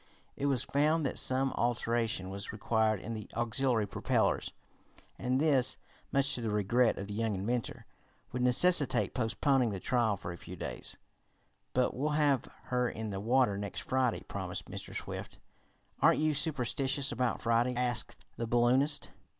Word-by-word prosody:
It 140 - -1
was 130 -4 +1
found 150 +2 +1
that 135 - 0
some 130 +1 +3
alteration 115 -5 -1
was 100 +1 -5
required 110 0 +1
in 115 - -5
the 110 -1 -7
auxiliary 120 -1 +1
propellers, - - 0 0.7
and 125 +1 0
this, 140 -5 +3 0.3
much 140 +1 +4
to 125 - -2
the 115 - -2
regret 105 +4 +2
of 100 - -4
the 100 - -7
young 110 -1 -1
inventor, 115 +5 -3 0.5
would 125 - -3
necessitate 145 +5 +4
postponing 125 +1 +1
the 100 -2 -4
trial 115 -3 +1
a 85 - -5
few - - -9
days. - - -6 0.8
"But 125 0 +1
we'll 150 +4 0
have 145 -5 +2 0.2
her 125 -1 0
in 110 -2 -5
the 95 - -4
water 115 -2 +2
next 100 -1 -5
Friday," 130 -3 0
promised - - -5
Mr. - - -7
Swift. - - -6 0.6
"Aren't - - +5
you 155 0 +2
superstitious 140 -1 +1
about 120 0 -1
Friday?" 120 +2 +2
asked 120 -1 0
the 115 - -3
balloonist. 125 +5 +2
120 Hz, 155 wpm, -31 LUFS, 110-135 Hz, 0.8 s, Aren't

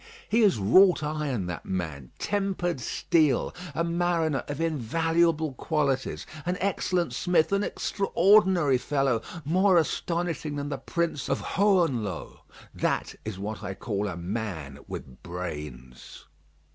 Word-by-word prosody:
He 230 +2 +3
is 205 - +4
wrought 175 - +5
iron, 150 -9 -2
that 90 -1 -5
man; 80 -9 -4
tempered 195 -6 -1
steel, 150 +3 +1 0.2
a 165 - +1
mariner 170 -3 0
of 145 -1 -4
invaluable 165 +1 +1
qualities, 140 -1 -1 0.2
an 180 +2 -1
excellent 185 -2 0
smith, 180 -2 +2
an 200 +1 +2
extraordinary 190 -9 +3
fellow, 135 -4 +1 0.2
more 185 +4 +4
astonishing 165 -2 -1
than 145 0 -3
the 140 - -3
Prince 170 -5 -2
of - - +1
Hohenlohe. 165 - +1 0.3
That - - -1
is 110 -3 -5
what 105 +2 -5
I 95 -2 -5
call 105 -1 -2
a 90 -4 -4
man 85 -7 -4
with 65 - -8
brains. 75 -8 -7
150 Hz, 125 wpm, -27 LUFS, 105-175 Hz, 0.3 s, wrought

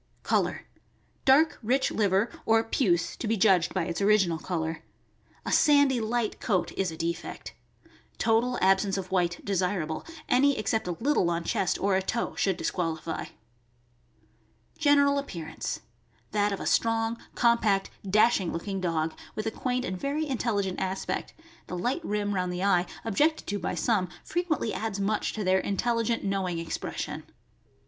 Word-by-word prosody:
Color. - - 0 0.3
— - - -39
Dark, 290 +4 +5
rich 255 +4 +1
liver, 200 +1 +2 0.2
or 225 0 +4
puce 180 -7 +1
(to 230 - -4
be 225 +1 +1
judged 185 -4 +4
by 185 - 0
its 170 +1 -3
original 195 -5 +3
color). 160 -2 -3 0.6
A - - -2
sandy, 285 -4 +4
light 225 0 -1
coat 185 -5 0
is 190 -2 -1
a 160 - -8
defect. 170 +1 -4 0.6
Total 235 +2 +2
ab 190 0 +5
sence 195 -1 -1
of 185 -1 -5
white 175 -2 0
desirable; 180 -5 -1 0.2
any 275 +2 +4
except 220 -1 -1
a 175 - -1
little 260 -9 +2
on 170 0 -1
chest 180 0 0
or 195 -1 +2
a 190 - +2
toe 225 +5 -2
should 190 -3 0
disqualify. 165 -3 -2 1.5
General 285 -2 +4
appearance. 165 - -5 0.2
— 115 0 -37
That 205 -1 +1
of 200 - -3
a - - -5
strong, 225 0 +1 0.2
compact, 225 -5 +2
dash 210 +3 +4
ing 180 - -2
looking 190 +3 -4
dog, 165 -2 0 0.2
with 215 - -3
a 220 - 0
quaint 250 +2 -2
and 185 - -3
very 290 +3 -1
intelligent 215 -8 -1
aspect 190 0 -3 0.3
(the 180 - -4
light 255 - -1
rim 205 -3 -1
round 180 -2 -1
the 180 +1 -3
eye, 180 -3 +3 0.2
objected 300 +9 +1
to 205 0 -2
by 175 - -2
some, 205 -7 +1
fre 345 - -2
quently 310 -10 -1
adds 220 -2 -3
much 210 +2 0
to 215 - -3
their 190 0 +3
intelligent, 230 +3 0
knowing 195 -3 -1
expres 165 0 -4
sion). - - -5
200 Hz, 165 wpm, -28 LUFS, 180-235 Hz, 1.5 s, Dark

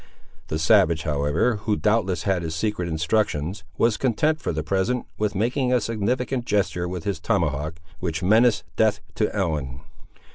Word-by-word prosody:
The 80 - -2
savage, 85 -1 +4
however, 75 +9 +1
who 105 +1 -1
doubtless 95 -6 +1
had 95 -2 +1
his 80 -1 -4
secret 90 0 -1
instructions, 85 +1 -1
was 115 -2 +2
content, 150 +7 +1
for - - -1
the 80 -2 -2
present, 105 +6 0
with 105 -1 0
making 125 +5 0
a 125 - +4
significant 120 +4 -1
gesture 95 -5 0
with 90 -2 -5
his 100 +1 -2
tomahawk, 80 -7 -1 0.2
which 85 -1 -3
menaced 110 +3 +4
death 110 -2 +2
to 105 - 0
Ellen. 75 -10 -2
100 Hz, 155 wpm, -24 LUFS, 80-110 Hz, 0.2 s, savage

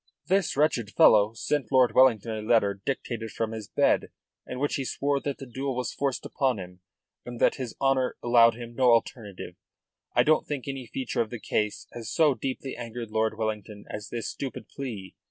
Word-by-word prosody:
"This 190 -6 +1
wretched 140 -8 +2
fellow 105 0 +5
sent 140 0 -1
Lord 130 -2 +4
Wellington 120 -4 +4
a 110 - -4
letter 100 -3 +2
dictated 120 -4 -3
from 115 +1 -3
his 110 -2 -6
bed, - - +2 0.4
in 125 - -5
which 145 +2 -1
he 135 - -1
swore 140 +2 0
that 140 0 -4
the 135 - -8
duel 130 +2 -3
was 125 0 -2
forced 140 -2 -2
upon 130 -5 0
him, 90 -1 -9 0.4
and 120 -1 -8
that - - +3
his 125 -3 -5
honour 135 -2 +1
allowed 115 -1 +6
him 120 0 -8
no 130 +2 +1
alternative. 115 -4 -1 0.6
I - - +6
don't 155 0 +3
think 145 -3 -4
any 135 -3 -5
feature 130 +3 -2
of 110 - -2
the 120 - -6
case 105 0 -1
has 115 -2 -6
so 155 -4 +4
deeply 130 0 -4
angered 115 -1 -6
Lord 110 0 0
Wellington 105 -2 -4
as 105 0 -6
this 120 -1 -4
stupid 135 -2 -6
plea. 110 -9 -6
120 Hz, 190 wpm, -27 LUFS, 110-135 Hz, 0.6 s, allowed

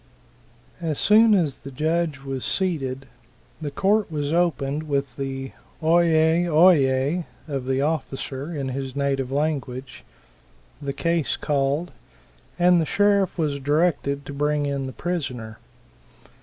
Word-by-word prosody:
As 160 -4 -2
soon 215 +1 +6
as 155 -8 0
the 140 - -9
judge 155 +1 -1
was 135 -2 -4
seated, 135 -8 -1 0.6
the 150 - -3
court 200 +6 +1
was 145 0 -2
opened 155 -3 0
with 140 -3 -1
the 135 -1 -4 0.3
"oi 170 +2 +4
yis, 160 +2 +3
oi 170 +4 +7
yis" 135 +4 +1 0.2
of 135 -4 -4
the 135 0 +1
officer 145 -1 -3
in 140 -5 -3
his 135 0 -5
native 135 -2 -1
language, 135 -3 -3 0.8
the 140 -1 -3
case 165 +1 0
called, 145 +4 0 0.7
and 175 -1 +5
the - - 0
sheriff 200 -2 +2
was 150 -4 -1
directed 145 -1 0
to 145 - -7
bring 145 +1 0
in 140 -1 -2
the - - -5
prisoner. 130 -11 -4
145 Hz, 135 wpm, -24 LUFS, 135-170 Hz, 0.8 s, oi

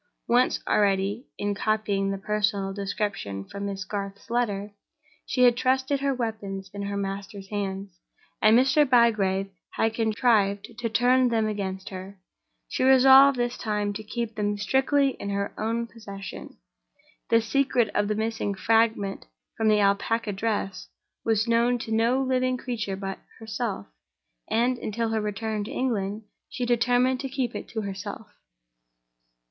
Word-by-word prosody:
Once 245 +2 +3
already 200 +4 +1
(in 205 0 -1
copying 205 -1 0
the 195 - -2
personal 205 -1 -1
description 195 - -3
from 200 - -5
Miss 195 -1 -4
Garth's 200 +2 -6
letter) 205 -4 -1 0.5
she 250 - +2
had 245 -1 +6
trusted 260 +2 +1
her 275 0 +1
weapons 210 -6 -4
in 200 - -5
her 200 0 -3
master's 195 0 -5
hands, 195 -3 -4 0.4
and 215 +2 +6
Mr. 265 +4 +5
Bygrave 215 -7 +3 0.2
had 225 0 +1
contrived 220 -2 +1
to 235 -1 -1
turn 250 +3 +3
them 225 -2 +1
against 190 -2 -4
her. 190 +1 -8 0.5
She - - -3
resolved 265 +1 +7
this 240 0 -1
time 210 -2 -1
to 210 - -5
keep 230 +1 -4
them 205 -1 -1
strictly 270 +6 +2
in 200 - -4
her 200 0 -2
own 230 +2 -1
possession. 200 -4 -9 0.7
The 230 - +5
secret 240 -1 +1
of 205 0 +1
the 215 - 0
missing 220 -2 -2
fragment 220 - +1 0.3
of 220 - +2
the 210 -1 +4
Alpaca 205 +3 +1
dress 195 -2 -2 0.4
was 220 0 +1
known 235 +1 +3
to 230 -1 -7
no 235 +4 +2
living 255 -1 +1
creature 225 -6 -3
but 195 0 -5 0.2
herself; 220 - -4 0.6
and, 240 +2 +1
until 225 +1 -2
her 220 -1 0
return 210 0 -2
to 230 - -7
England, 220 -6 -2 0.3
she 250 - -3
determined 245 +2 +2
to 270 - -4
keep 260 -2 -2
it - - -6
to 220 - -4
herself. 200 +1 -6
215 Hz, 150 wpm, -26 LUFS, 200-240 Hz, 0.7 s, resolved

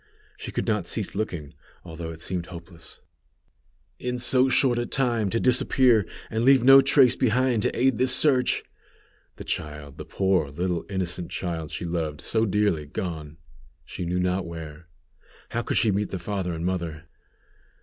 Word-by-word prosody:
She - - -7
could - - -2
not - - -1
cease - - -2
looking, 85 -8 -4 0.3
although 80 -1 -7
it 80 0 -9
seemed 85 -1 -3
hopeless. 85 -2 -12 1.0
"In 125 0 -3
so 130 +2 +4
short 125 -2 +2
a 120 - -2
time 120 -6 0
to 115 - 0
disappear, 125 -4 +3 0.2
and 110 +1 -1
leave 135 -1 +5
no 135 +1 +9
trace 135 -2 +4
behind 125 -1 +1
to - - -1
aid 130 -2 +3
this 130 0 +2
search!" 130 -2 +3 0.7
The - - -9
child! 75 -2 -5
The - - -6
poor 95 -6 0
little 85 +3 -3
innocent 90 -3 -3
child 80 -4 -4
she - - -5
loved 80 -3 -3
so 110 0 0
dearly, 100 -7 0
gone, 80 -1 -6 0.5
she - - -6
knew 90 +1 -1
not 90 0 -1
where! 80 -1 -9 0.6
How 120 - -2
could - - -2
she 110 - +3
meet 100 +1 -1
the 95 - -4
father 95 0 -3
and 80 +1 -4
mother? 85 -3 -3
95 Hz, 165 wpm, -25 LUFS, 85-120 Hz, 1.0 s, no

